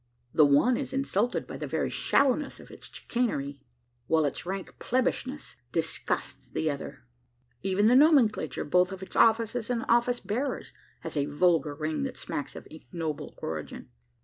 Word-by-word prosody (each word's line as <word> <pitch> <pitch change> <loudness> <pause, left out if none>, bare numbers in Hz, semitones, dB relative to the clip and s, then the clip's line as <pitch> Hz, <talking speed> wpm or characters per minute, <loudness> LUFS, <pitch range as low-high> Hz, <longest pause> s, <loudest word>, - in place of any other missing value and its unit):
The 150 -2 +6
one 190 - +4
is 265 -2 -4
insulted 245 -4 0
by - - -7
the - - -5
very - - -1
shallowness 280 +1 +1
of - - -13
its - - -11
chicanery, 145 - -2 0.5
while 160 -1 +3
its 145 +4 -3
rank 190 0 -5
plebbishness 260 +2 -1
disgusts 165 -1 -2
the 155 - 0
other. 140 -3 -7 0.6
Even 195 +2 +1
the 240 +3 +6
nomenclature, 260 - +4
both 180 +4 +3
of 190 0 -6
its - - -10
offices 225 +1 +3
and 235 -2 -1
office 240 +1 +3
bearers, 250 +7 -3 0.3
has - - -6
a 145 -1 +1
vulgar 155 0 +2
ring 155 +1 -2
that 270 -2 -3
smacks 145 - -5
of - - -9
ignoble 160 -1 -5
origin. 75 -5 -5
195 Hz, 155 wpm, -28 LUFS, 155-245 Hz, 0.6 s, The